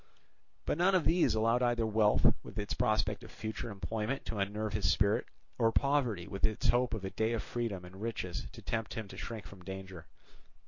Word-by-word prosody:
But 150 - 0
none 190 +2 +5
of 180 - +3
these 170 -6 +4
allowed 115 +3 +3
either 120 -2 +2
wealth 110 -1 +4
with 100 - -11
its 105 -1 -1
prospect 110 +1 +1
of 110 - -10
future 110 +1 -5
enjoyment 110 +6 -3
to 110 - -3
unnerve 105 +2 -1
his 105 -1 +2
spirit, 100 +1 +2 0.3
or 115 -1 +4
poverty 125 -10 +1
with 100 0 -6
its 110 0 +2
hope 120 -1 +3
of 100 -3 -5
a 95 - -3
day 110 +1 0
of 115 - -1
freedom 110 -7 -3
and 95 +2 -11
riches 105 -6 -3
to - - -12
tempt 115 0 -2
him 110 -3 -4
to - - -9
shrink 115 -3 -5
from 95 -2 -12
danger. 95 -3 -7
110 Hz, 200 wpm, -33 LUFS, 100-115 Hz, 0.3 s, none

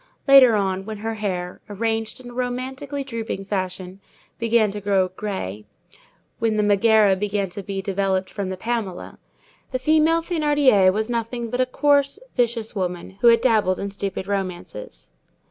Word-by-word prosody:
Later 265 -4 +8
on, 190 -2 -1
when 215 -1 -5
her 225 +2 -3
hair, 185 -5 -4
arranged 225 +2 -2
in 245 -1 -10
a - - -12
romantically 260 +3 -4
drooping 225 -6 -5
fashion, 185 -1 -4 0.4
began 230 -2 +2
to 205 0 -6
grow 195 -2 +2
gray, 185 - -5 0.8
when 225 -1 +1
the 210 - +2
Megæra 205 -1 +4
began 205 -1 -1
to 200 - -6
be 195 0 -5
developed 190 -1 0
from 200 -3 -4
the 190 - -4
Pamela, 220 -4 -4 0.5
the 255 - 0
female 315 +4 +3
Thénardier 290 - +3
was 215 +3 -1
nothing 235 0 -3
but 250 - 0
a 255 - +1
coarse, 285 +3 +2 0.2
vicious 235 -2 0
woman, 180 0 -4
who 240 - +5
had 230 -1 +6
dabbled 215 -7 +2
in 200 0 -4
stupid 195 -1 -4
romances. 200 - -5
215 Hz, 160 wpm, -22 LUFS, 195-245 Hz, 0.8 s, Later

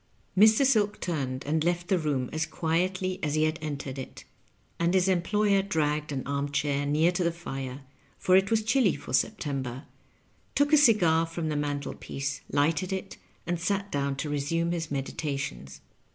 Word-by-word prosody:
Mr. 220 +7 +6
Silk 210 -6 +2
turned 135 -7 -3
and 155 +2 +1
left 175 +1 0
the 190 -3 +2
room 140 -5 -1
as 160 +1 -1
quietly 180 +3 -1
as 150 -1 -1
he 155 - +2
had 155 +1 0
entered 140 -3 -5
it, 130 - -8 0.6
and 170 +2 +2
his 185 0 +3
employer 200 +2 +2
dragged 150 -5 -1
an 135 -2 -3
arm 140 0 -2
chair 140 0 0
near 155 +4 +3
to 180 0 -1
the 170 - +2
fire, 135 -5 -6 0.4
for 185 - +3
it 190 +1 +4
was 225 -1 +2
chilly 230 -4 +3
for 140 - -9
September, 135 - -1 0.7
took 285 +2 +2
a - - +9
cigar 175 - +4
from 165 -1 -3
the 150 - -1
mantelpiece, 140 -1 -3
lighted 155 +5 +1
it, 190 0 -4 0.3
and 175 0 -1
sat 200 +3 -1
down 140 -1 -1
to 140 +3 -4
resume 150 +4 -1
his 165 -3 -3
meditations. 135 - -4
160 Hz, 170 wpm, -28 LUFS, 140-185 Hz, 0.7 s, a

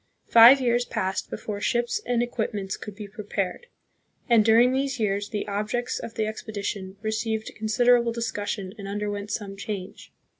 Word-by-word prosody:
Five 235 +4 +9
years 240 -1 +2
passed 190 -5 -2
before 205 -2 -5
ships 240 - 0
and 240 -1 +2
equipments 210 -5 -3
could 210 -2 -9
be 210 -1 -8
prepared, 200 - -4 0.6
and 230 -3 +5
during 230 +3 +5
these 270 -1 -1
years 205 -1 0
the 210 -1 -3
objects 210 +4 -2
of 230 - -8
the 220 - 0
expedition 200 -3 -5
received 220 0 -2
considerable 235 +2 +3
discussion 205 -4 -3
and 200 - -6
under 205 +1 -2
went 205 0 -5
some 205 -2 -4
change. 195 -2 -7
215 Hz, 155 wpm, -25 LUFS, 205-235 Hz, 0.6 s, Five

